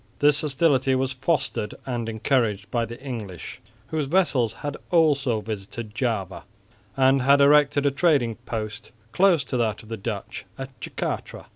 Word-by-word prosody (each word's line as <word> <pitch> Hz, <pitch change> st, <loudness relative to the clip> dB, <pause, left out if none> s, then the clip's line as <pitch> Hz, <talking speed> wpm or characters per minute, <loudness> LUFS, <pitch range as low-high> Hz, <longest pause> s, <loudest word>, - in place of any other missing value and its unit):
This 145 Hz, 0 st, +4 dB
hostility 135 Hz, -3 st, +2 dB
was 130 Hz, 0 st, 0 dB
fostered 130 Hz, -4 st, -1 dB
and 120 Hz, -3 st, -3 dB
encouraged 110 Hz, -3 st, 0 dB
by 120 Hz, -1 st, 0 dB
the 120 Hz, +3 st, -9 dB
English, 115 Hz, -, -7 dB, 0.3 s
whose 155 Hz, -3 st, -1 dB
vessels 140 Hz, -, +2 dB
had 145 Hz, 0 st, -2 dB
also 140 Hz, -9 st, +2 dB
visited 105 Hz, +1 st, -6 dB
Java 110 Hz, -6 st, -2 dB, 0.5 s
and 135 Hz, 0 st, +4 dB
had 140 Hz, +2 st, +5 dB
erected 145 Hz, 0 st, +5 dB
a 140 Hz, -, +4 dB
trading 135 Hz, -7 st, +2 dB
post 110 Hz, -1 st, -5 dB, 0.2 s
close 180 Hz, -6 st, +4 dB
to 130 Hz, -, -3 dB
that 110 Hz, -3 st, -1 dB
of 110 Hz, -, -15 dB
the 115 Hz, -, -4 dB
Dutch 100 Hz, -, -5 dB
at 135 Hz, 0 st, -6 dB
Jacatra. -, -, -4 dB
130 Hz, 150 wpm, -24 LUFS, 115-145 Hz, 0.5 s, had